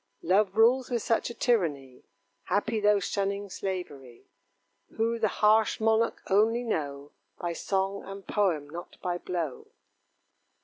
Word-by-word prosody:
Love 195 +2 +2
rules 245 +3 +4
with 240 -3 -1
such 230 - +1
a - - -6
tyranny, 150 - 0 0.4
Happy 220 +2 0
those 205 -1 +3
shunning 200 0 -2
slavery; 145 -12 -6 0.7
Who 230 +1 0
the 220 - +3
harsh 215 +1 +3
monarch 225 +1 +1
only 225 +5 +3
know 145 -9 -3 0.3
By 175 -1 -3
song 195 +3 -1
and 195 0 -9
poem, 175 -9 0
not 170 +4 -9
by 175 -1 -1
blow. 170 -8 -4
200 Hz, 130 wpm, -28 LUFS, 175-220 Hz, 0.7 s, rules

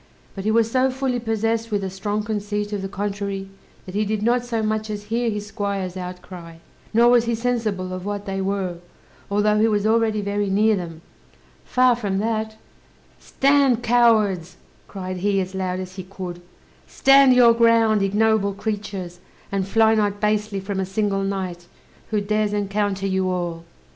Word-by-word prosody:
But 195 0 -7
he - - +2
was 225 0 +2
so 260 +1 +3
fully 260 -1 -1
possessed 225 0 -1
with 205 -2 -1
a 190 - -2
strong 205 +2 -2
conceit 210 -1 -3
of 205 - -2
the 195 - -3
contrary, 200 -1 -4 0.4
that 185 - -9
he 210 +2 +1
did 210 0 -2
not 240 +2 +2
so 230 -2 -2
much 215 0 -1
as 205 -1 -4
hear 230 +3 -1
his 210 -1 -4
squire's 200 -3 -3
outcry, 180 -2 -8 0.4
nor 235 +2 +5
was 240 -1 +4
he 235 0 0
sensible 220 -6 -2
of 185 0 -5
what 205 0 -4
they 195 0 -3
were, 190 -2 -2 0.5
although 210 +1 +2
he 220 - +4
was 210 -2 0
already 220 -1 +2
very 200 0 -1
near 215 +3 +3
them; 170 -3 -7 0.6
far 255 -1 +3
from 205 -5 -2
that: 220 +1 -2 0.6
"Stand, 275 -3 +2
cowards," 220 -7 +2 0.3
cried 185 -2 -6
he, 195 +2 +1
as 185 0 -3
loud 185 -1 -2
as 185 +1 -8
he 185 - -5
could; 180 -2 -8 0.5
"stand 270 -1 +5
your 240 -2 +7
ground, 230 -2 +4
ignoble 205 0 +2
creatures, 200 -4 -5 0.3
and 195 -1 -1
fly 220 +2 +4
not 205 -2 0
basely 210 -1 0
from 195 0 -4
a - - +1
single 195 0 0
knight, 185 -3 -4 0.4
who 215 - +1
dares 210 0 0
encounter 200 -1 -1
you 190 -1 0
all!" 175 -2 -3
205 Hz, 175 wpm, -22 LUFS, 195-225 Hz, 0.6 s, your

